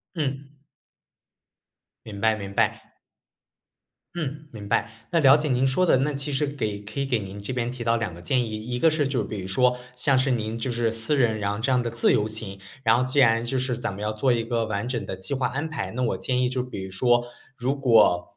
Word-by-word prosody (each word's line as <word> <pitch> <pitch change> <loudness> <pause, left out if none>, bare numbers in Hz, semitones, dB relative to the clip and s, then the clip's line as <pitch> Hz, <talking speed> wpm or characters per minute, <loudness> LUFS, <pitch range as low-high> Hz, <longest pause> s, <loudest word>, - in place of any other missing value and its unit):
嗯。 140 -3 -3 1.6
明 105 -2 -8
白 110 0 +3
明 100 -2 -7
白。 - - -1 1.2
嗯， 150 -2 -5
明 105 -3 -9
白， 115 +3 +1 0.2
那 170 - +3
了 140 -2 +7
解 150 - -2
您 130 +1 +2
说 160 +8 +2
的， 160 - +4
那 145 +3 0
其 140 +1 -4
实 140 +2 0
给 110 -8 -3
可 105 +5 -7
以 140 - 0
给 125 -4 0
您 100 0 -8
这 100 +6 -5
边 120 -1 -2
提 125 -1 -6
到 115 0 +2
2 115 -7 -3
个 85 - -11
建 125 +7 +1
议。 110 0 -6
一 125 +1 -3
个 165 - +5
是 155 -3 0
就 130 -5 -1
比 105 0 -5
如 95 - -6
说 125 +6 +2 0.2
像 130 +2 +2
是 130 +1 +2
您 110 -1 -2
就 120 +2 -3
是 120 -1 0
私 115 +6 +4
人 115 -5 +2
然 100 -1 -1
后 105 - -4
这 125 +4 0
样 125 -1 +2
的 120 - -3
自 115 0 +4
由 105 - +1
行， 110 -3 -5 0.2
然 115 0 +4
后 125 - +1
既 130 +2 0
然 115 -3 +4
就 130 +2 -1
是 125 -2 -2
咱 115 -4 -3
们 100 - -8
要 105 0 -1
做 125 +4 +2
一 115 -1 0
个 115 -1 -1
完 110 +1 -3
整 115 -5 -3
的 95 - -5
计 95 +8 -5
划 130 -1 0
安 145 +5 -3
排， 95 -11 -4
那 125 - -4
我 120 - 0
建 125 -1 -1
议 125 - +2
就 125 0 -2
比 125 -6 -7
如 95 - -7
说， 120 +5 +2 0.3
如 130 +2 -1
果， 115 -9 +3
120 Hz, 260 characters per minute, -25 LUFS, 110-130 Hz, 1.6 s, 了